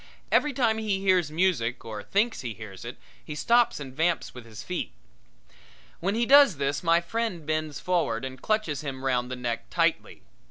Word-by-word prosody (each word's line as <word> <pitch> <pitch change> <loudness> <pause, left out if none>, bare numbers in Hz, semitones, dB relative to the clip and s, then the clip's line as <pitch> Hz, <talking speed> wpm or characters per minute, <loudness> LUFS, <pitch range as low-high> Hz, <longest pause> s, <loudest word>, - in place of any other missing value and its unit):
Every 295 - +3
time 235 -4 +1
he 210 -3 -1
hears 185 -5 +2
music 150 -9 0
or 110 -2 -6
thinks 220 - 0
he 120 -4 -5
hears 105 -4 -10
it 120 - -7 0.3
he 150 - -7
stops 235 +5 +3
and 135 -2 -8
vamps 165 +2 0
with 125 -2 -10
his 110 0 -9
feet. 180 +6 -4 1.1
When 195 +4 -1
he 235 +1 +1
does 275 - +7
this 140 +1 -1
my 170 0 +3
friend 185 -3 -3
bends 155 -1 -2
forward 165 -10 0
and 130 0 -8
clutches 215 -9 0
him 135 -2 -6
round 125 -2 0
the 125 - -3
neck 120 -2 -4
tightly. - - 0
155 Hz, 185 wpm, -27 LUFS, 125-200 Hz, 1.1 s, does